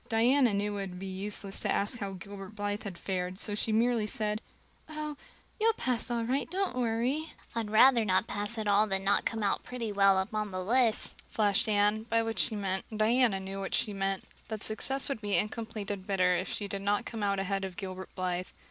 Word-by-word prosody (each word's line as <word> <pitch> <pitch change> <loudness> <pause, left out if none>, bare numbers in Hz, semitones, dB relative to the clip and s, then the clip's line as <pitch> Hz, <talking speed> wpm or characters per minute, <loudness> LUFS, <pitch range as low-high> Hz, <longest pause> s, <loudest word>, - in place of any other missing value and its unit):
Diana 245 +2 +4
knew 205 +1 -1
it - - -2
would 180 - -9
be 195 - -6
useless 195 +1 -3
to - - 0
ask 210 +4 +1
how 195 -1 -4
Gilbert 195 +2 -9
Blythe 205 +1 -3
had 190 -4 -6
fared, 185 0 -3
so 205 - -1
she 210 +2 0
merely 230 0 +2
said: 210 0 -1 0.5
"Oh, 305 -1 -4 0.4
you'll 450 +1 +4
pass 250 - -1
all 235 -1 0
right. 260 +5 -1
Don't 380 -4 0
worry." 250 +6 0 0.2
"I'd 230 -2 -2
rather 235 +2 +6
not 185 0 +2
pass 205 +2 -2
at 220 - -2
all 205 +1 +4
than 195 -1 -1
not 200 +1 +3
come 225 -1 -1
out 200 - +1
pretty 235 -3 -4
well 195 -1 +5
up 190 +3 -1
on 215 -1 -1
the 185 -1 -4
list," 235 0 +2
flashed 205 +1 +2
Anne, 210 +1 +3
by 230 0 +3
which 225 0 -2
she 225 - +2
meant 195 -2 -1
and 215 - -6
Diana 225 -1 +3
knew 195 +1 -5
she 210 - +1
meant 195 -1 -1 0.2
that 215 -1 -5
success 265 +5 0
would 275 -6 -3
be 205 -2 +1
incomplete 215 -1 -2
and 195 -2 -5
bitter 180 -2 +3
if 180 +1 -2
she 205 - -3
did 200 0 -4
not 205 +1 +1
come 225 - -5
out 200 -1 +1
ahead 195 0 -1
of 190 -2 -5
Gilbert 190 -1 -6
Blythe. 185 0 -2
210 Hz, 220 wpm, -30 LUFS, 195-230 Hz, 0.5 s, rather